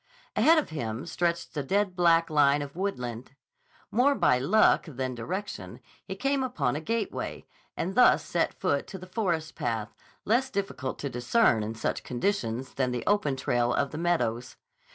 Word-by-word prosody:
Ahead 325 +1 +5
of 305 - 0
him 115 -5 -4
stretched 170 0 -1
the 150 - -2
dead 195 +6 0
black 170 -2 +3
line 145 -1 +4
of 140 +1 -9
woodland. 130 - -4 0.6
More 270 +5 +3
by 125 - +3
luck 205 +12 +4
than 130 -3 -3
direction, 185 - -5 0.2
he - - -6
came 275 0 0
upon 150 - -1
a 150 - -3
gateway, 225 +4 -3 0.3
and 185 +3 -2
thus 210 -10 +5
set 170 +1 -1
foot 140 -1 0
to 195 - -7
the 185 - -10
forest 175 -5 -2
path, 115 -2 -3 0.3
less 245 +5 +2
difficult 195 - -3
to 140 - -4
discern 125 - +2
in 110 +2 -4
such 110 - -2
conditions 125 - -2
than 130 -2 0
the 125 -1 -3
open 205 -10 +2
trail 120 -2 0
of 140 - 0
the 155 - -5
meadows. 125 -9 -1
155 Hz, 170 wpm, -28 LUFS, 125-200 Hz, 0.6 s, Ahead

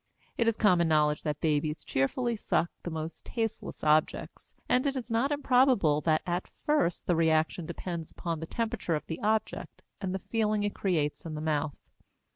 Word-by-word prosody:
It 230 - +1
is 230 - +2
common 180 -5 +4
knowledge 150 -1 +3
that 150 -2 -2
babies 150 0 0
cheerfully 235 - 0
suck 175 -4 0
the - - -5
most 160 0 -5
tasteless 225 -2 -4
objects, 155 0 +1
and 255 +3 +2
it 275 - 0
is 245 -2 -5
not 235 +5 +2
improbable 255 - +3
that 155 -1 +2
at 175 +1 -2 0.2
first 295 - +1
the 175 - +2
reaction 160 0 +2
depends 170 -1 -5
upon 165 -2 -4
the 165 - -5
temperature 225 -7 -1
of 150 - -4
the 160 - -5
object 215 +1 -1 0.2
and 190 -2 -2
the 190 - -6
feeling 215 -2 +1
it 205 - -1
creates 155 -7 -1
in 160 -2 -5
the - - -4
mouth. 155 -2 -1
175 Hz, 180 wpm, -29 LUFS, 155-225 Hz, 0.2 s, common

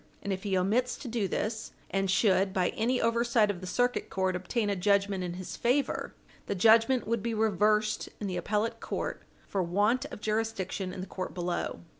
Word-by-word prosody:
And 200 - -1
if 190 - -4
he 195 -2 0
omits 225 +7 +1
to 270 - -8
do 225 -4 -1
this, 220 +4 -3 0.2
and 195 0 0
should, 190 -1 +3
by 185 -2 +2
any 245 +3 0
oversight 230 -2 +3
of 185 -3 -8
the 185 - -6
Circuit 245 +6 0
Court, 190 -1 0
obtain 205 +5 -1
a 200 - +1
judgment 200 0 +2
in 175 -1 -3
his 185 0 -6
favor, 255 +4 0 0.3
the 200 - -1
judgment 225 +5 +5
would 230 0 0
be 230 0 -2
reversed 215 0 +2
in 210 - -4
the 185 -2 -2
appellate 210 +2 -1
court - - -4 0.3
for 195 - -1
want 205 +9 +1
of 290 - -8
jurisdiction 215 -4 -2
in 185 - -6
the - - -4
court 185 -1 -6
below. 175 -1 -2
205 Hz, 195 wpm, -29 LUFS, 190-225 Hz, 0.3 s, judgment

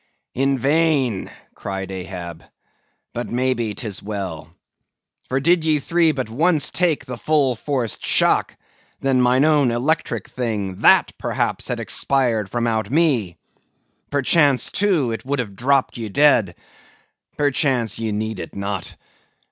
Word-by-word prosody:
"In 135 +1 +1
vain!" 140 - +1 0.2
cried 95 -1 -5
Ahab; 90 -3 -7 0.7
"but, 120 - -4
maybe, 120 -3 -1
'tis 105 -5 -4
well. 95 -7 -5 0.8
For 130 - +1
did 170 +4 +3
ye 155 -1 +2
three 165 +3 +2
but 130 -5 -3
once 155 +7 +1
take 165 -6 0
the 125 -3 -7
full 145 -5 +2
forced 125 -2 -3
shock, - - +2 0.4
then 135 -2 +2
mine 125 +3 +3
own 150 -4 +3
electric 130 +7 -1
thing, 105 -7 -3
that - - +5
had - - -21
perhaps - - -2
expired 120 -7 0
from 120 +2 -1
out 110 -3 -1
me. 130 - +1 0.7
Perchance, 140 -1 +3
too, 180 - +1
it 115 -1 -5
would 140 +2 -2
have 110 -6 -4
dropped 130 +2 +1
ye 110 -2 -4
dead. 115 - +3 0.8
Perchance 130 - +1
ye 110 -1 -2
need 110 -1 -3
it - - -8
not. 100 -2 -4
125 Hz, 135 wpm, -21 LUFS, 105-145 Hz, 0.8 s, that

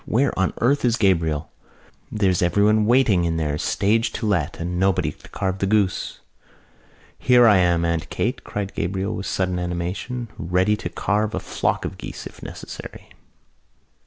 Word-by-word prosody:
"Where 135 +6 +2
on 95 0 +2
earth 140 +4 +2
is 120 -2 +3
Gabriel? 80 -8 +1 0.6
There's 95 -4 +1
everyone 105 +4 +3
waiting 115 -7 +4
in 85 -1 0
there, 75 -2 -1
stage 110 +8 +1
to 115 - -3
let, 85 -7 0
and 90 +1 -3
nobody 95 -1 +2
to - - -17
carve 95 0 -2
the 95 - 0
goose!" 100 -2 0 1.0
"Here 125 -1 +5
I 105 -4 +6
am, 85 -2 +2
Aunt 85 -2 -1
Kate!" - - -2
cried 100 -1 -4
Gabriel, 95 +3 -2
with 100 - -5
sudden 90 -1 -1
animation, 90 +8 -4
"ready 90 +4 +2
to 105 -4 -5
carve 105 +4 -1
a - - -1
flock - - -1
of - - -6
geese, - - -7
if - - -11
necessary." - - -9
95 Hz, 160 wpm, -22 LUFS, 85-110 Hz, 1.0 s, I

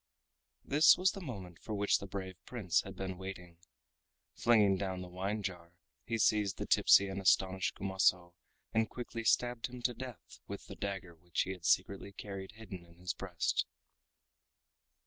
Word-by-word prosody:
This 150 +3 +6
was 185 +1 +3
the 195 - -8
moment 95 - -7
for 110 - -5
which 100 0 +2
the 100 - -7
brave 95 -1 -6
Prince 105 -9 +1
had 95 -1 -9
been 95 -1 -5
waiting. 90 -3 -8 0.7
Flinging 105 -5 +4
down 95 -1 -3
the - - -8
wine 95 +4 -3
jar, 90 -3 -5 0.3
he 115 -1 0
seized 105 -2 +2
the - - -3
tipsy 100 - +6
and 95 0 -4
astonished 95 0 +2
Kumaso 90 -2 +1 0.4
and 110 0 +2
quickly 120 -2 -5
stabbed 120 +1 +2
him 125 0 -9
to 125 - +2
death 125 -1 -9
with - - -7
the - - -9
dagger 95 -3 -4
which 85 0 -2
he 95 - -4
had 90 -3 -8
secretly 100 +2 +1
carried 95 +1 -7
hidden 100 -5 -9
in 85 0 -19
his 90 0 -3
breast. 90 -3 -1
95 Hz, 165 wpm, -34 LUFS, 90-110 Hz, 0.7 s, This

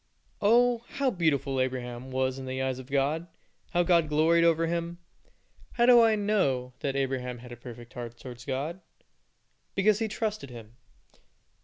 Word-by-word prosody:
Oh, 240 +3 +4
how 275 -2 +1
beautiful 140 - +1
Abraham 125 -1 -4
was 130 0 -1
in 130 - -7
the 130 0 -3
eyes 130 -1 -1
of 130 +1 -11
God; 145 +5 0 0.4
how 175 0 +2
God 170 -3 +3
gloried 160 +3 +4
over 165 0 +3
him. 170 +1 -2 0.8
How 240 - +3
do 245 -1 +8
I 225 -1 +5
know 165 -13 0
that 140 -1 -2
Abraham 130 -2 -2
had 120 +1 -12
a - - -6
perfect 120 0 -11
heart 120 -1 -7
towards 125 -1 -10
God? 145 +7 -3 0.9
Because 200 +1 +3
he 225 - 0
trusted 215 - -3
Him. 115 -2 -11
140 Hz, 160 wpm, -28 LUFS, 130-180 Hz, 0.9 s, do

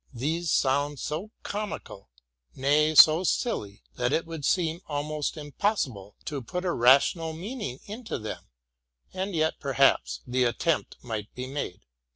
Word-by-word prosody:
These 160 +7 -1
sound 145 +2 +2
so 165 +8 -4
comical, 200 - -5 0.5
nay, 150 +3 +3
so 155 +4 +9
silly, 105 - -1
that 125 +1 +1
it 165 - +1
would 165 -2 -7
seem 170 -1 +1
almost 150 +1 -2
impossible 145 - -2
to 145 -3 -3
put 180 +10 -4
a 180 - +1
rational 140 +6 +4
meaning 180 - -5
into 220 +3 -5
them; 110 -2 -7 0.7
and 190 0 -3
yet, 160 0 +1
perhaps, 135 -1 +2
the 125 +1 +1
attempt 135 +7 0
might 110 -4 -5
be 125 - -4
made. 130 -9 -5
150 Hz, 140 wpm, -27 LUFS, 130-170 Hz, 0.7 s, so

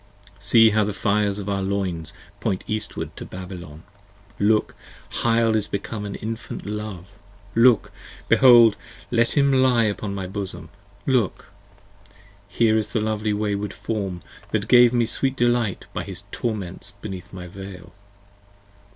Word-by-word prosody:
See 110 +2 +6
how 110 +1 +3
the 105 0 -3
fires 100 +1 +1
of 100 -1 -6
our 100 -1 -1
loins 95 -5 -2 0.3
point 100 -4 -1
eastward 110 0 -4
to - - -6
Babylon! 90 -4 -9 0.6
Look, 105 +1 +2 0.4
Hyle 115 -1 +2
is 105 -2 0
become 105 +1 -4
an 100 - -5
infant 115 +1 -6
Love! 100 -2 -6 0.3
look! 115 -1 +4 0.4
behold! 120 -4 +7 0.4
see 115 +5 +3
him 140 -1 +4
lie 130 -3 +4
Upon 105 -1 -2
my 95 -1 -4
bosom, 95 +1 -6 0.4
look! 125 -7 0 1.0
here 110 +1 +2
is 105 -1 -5
the 115 - +2
lovely 110 0 -1
wayward 105 -1 -1
form 100 -4 -4 0.3
That - - -1
gave 120 -1 +7
me 120 -1 +2
sweet 135 +3 -1
delight 120 -5 +1
by - - -3
his 95 -1 -8
torments 100 -7 -4
beneath 95 -2 -7
my 90 -2 -8
Veil! 95 0 -10
105 Hz, 140 wpm, -23 LUFS, 95-115 Hz, 1.0 s, behold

